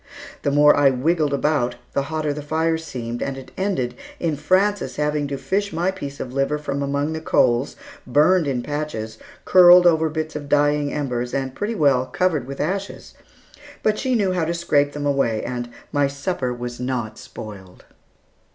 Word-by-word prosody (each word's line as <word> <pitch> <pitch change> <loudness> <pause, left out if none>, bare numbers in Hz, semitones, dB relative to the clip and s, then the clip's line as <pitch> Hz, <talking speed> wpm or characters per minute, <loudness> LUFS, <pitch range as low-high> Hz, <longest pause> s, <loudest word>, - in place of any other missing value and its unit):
The - - 0
more 145 +1 +6
I 145 -1 +5
wiggled 150 +3 +1
about, 140 -3 +1 0.2
the 140 - +1
hotter 155 -2 -1
the 150 - -6
fire 160 +2 0
seemed, 120 -7 -6
and 135 -1 -3
it 135 - -11
ended 185 -11 -1 0.3
in 165 -3 0
Frances 190 +7 +1
having 150 -1 0
to 140 0 -4
fish 200 +7 -1
my 170 +3 0
piece 140 -7 -7
of 125 - -6
liver 135 +2 0
from 140 -1 -3
among 140 +2 -1
the 160 - -4
coals, 125 -4 +2 0.3
burned 160 +3 +4
in 125 -3 -1
patches, 145 -7 -4 0.3
curled 180 -1 +8
over 160 -2 +4
bits 155 0 -4
of 145 -1 -6
dying 145 0 +2
embers, 125 -4 -2
and 135 -1 -2
pretty 210 +9 -3
well 135 -7 +3
covered 160 -8 0
with 140 0 -7
ashes, 190 +6 -3 0.7
but 215 0 +1
she 260 -2 0
knew 200 -5 +2
how 180 -2 0
to 170 +2 -2
scrape 145 -4 +1
them 145 0 -4
away, 135 -6 +1
and 120 -1 -4 0.2
my 145 -1 +2
supper 140 -1 -3
was 120 0 -6
not 125 -4 -3
spoiled. 95 -4 -11
145 Hz, 180 wpm, -22 LUFS, 130-160 Hz, 0.7 s, curled